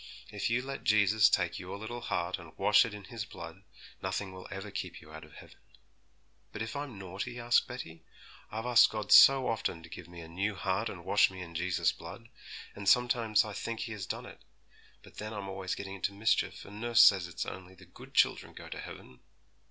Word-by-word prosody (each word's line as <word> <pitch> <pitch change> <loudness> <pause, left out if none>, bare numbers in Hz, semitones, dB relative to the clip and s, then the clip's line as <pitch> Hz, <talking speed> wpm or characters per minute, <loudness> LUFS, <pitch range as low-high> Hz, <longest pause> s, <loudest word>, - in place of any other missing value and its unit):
If - - -2
you 120 +2 +1
let 135 0 -6
Jesus 105 +1 +5
take 90 -4 0
your 90 +2 -7
little 120 +3 -6
heart 90 -5 -2
and 85 -3 -14
wash 105 +3 +5
it 115 - -6
in 105 - -10
His 110 +2 -6
blood, 85 -2 -10 0.4
nothing 95 +1 -3
will 95 0 -10
ever 95 +1 -7
keep - - -5
you 75 - -15
out 80 - -9
of 75 0 -15
heaven.' - - -14 0.9
'But 110 - -4
if 110 - -6
I'm 140 -6 -5
naughty?' 100 +6 -6
asked 120 0 +3
Betty. 80 0 -8 0.5
'I've 110 +2 -4
asked 120 -1 +6
God 105 -2 -5
so 135 -1 +8
often 95 -7 -2
to 85 - -12
give 90 +1 -9
me 85 -1 -10
a 80 - -10
new 100 +5 -2
heart 95 +3 -1
and 85 -2 -9
wash 100 +2 +4
me 95 -1 -8
in 85 -1 -11
Jesus' 90 +1 +1
blood, 115 0 -11 0.4
and 100 -1 -1
sometimes 120 -2 +3
I 105 - -6
think 115 +2 -4
He 115 - -4
has 100 -4 -6
done - - -4
it; - - -12 0.6
but - - -17
then 110 +1 -5
I'm 100 -2 -5
always 95 -1 -4
getting 95 -1 -7
into 100 +1 -3
mischief, 110 +3 0
and 105 +2 -10
nurse 120 -1 +6
says 95 -4 +6
it's 90 0 -4
only 95 0 -9
the - - -16
good - - -15
children - - +2
go - - -10
to - - -7
heaven.' 65 - -11
100 Hz, 215 wpm, -31 LUFS, 90-110 Hz, 0.9 s, so